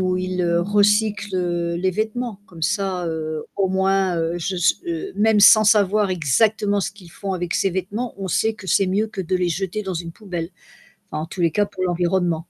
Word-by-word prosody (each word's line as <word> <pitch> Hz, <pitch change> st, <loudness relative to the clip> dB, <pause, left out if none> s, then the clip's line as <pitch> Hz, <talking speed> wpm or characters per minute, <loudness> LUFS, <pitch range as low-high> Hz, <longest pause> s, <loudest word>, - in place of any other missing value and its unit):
où 185 Hz, -1 st, +1 dB
ils 185 Hz, 0 st, -2 dB, 0.2 s
recyclent, 205 Hz, +1 st, +2 dB
heu, 175 Hz, -1 st, -1 dB
les 185 Hz, +2 st, 0 dB
vêtements. 215 Hz, +2 st, -3 dB
Comme 170 Hz, -6 st, -13 dB
ça, 190 Hz, -1 st, -1 dB
heu, 155 Hz, -1 st, -4 dB
au 195 Hz, -1 st, +1 dB
moins, 190 Hz, -1 st, +1 dB
heu, 165 Hz, +1 st, -1 dB
je 185 Hz, +3 st, -3 dB
s 175 Hz, +2 st, +3 dB
heu, 345 Hz, +3 st, -4 dB
même 215 Hz, 0 st, +3 dB
sans 215 Hz, +1 st, +8 dB
savoir 210 Hz, -1 st, +3 dB
exactement 200 Hz, -, +1 dB
ce -, -, -2 dB
qu'ils 190 Hz, -4 st, -16 dB
font 195 Hz, +3 st, -5 dB
avec 175 Hz, -1 st, -3 dB
ces -, -, +2 dB
vêtements, 205 Hz, +6 st, -4 dB
on 195 Hz, -1 st, -4 dB
sait 220 Hz, +6 st, +1 dB
que 205 Hz, -, -12 dB
c'est 195 Hz, +1 st, +3 dB
mieux 205 Hz, +4 st, 0 dB
que 195 Hz, -, -6 dB
de 185 Hz, 0 st, -1 dB
les 180 Hz, -1 st, 0 dB
jeter 190 Hz, +4 st, -3 dB
dans 190 Hz, -2 st, -4 dB
une 170 Hz, 0 st, -5 dB
poubelle. 175 Hz, -5 st, -5 dB, 0.6 s
Enfin 155 Hz, -, -3 dB
en -, -, -4 dB
tous 170 Hz, -, -10 dB
les 170 Hz, -1 st, +3 dB
cas 205 Hz, +5 st, +2 dB
pour 185 Hz, -, -6 dB
l'environnement. 175 Hz, 0 st, +1 dB
190 Hz, 210 wpm, -21 LUFS, 175-210 Hz, 0.6 s, sans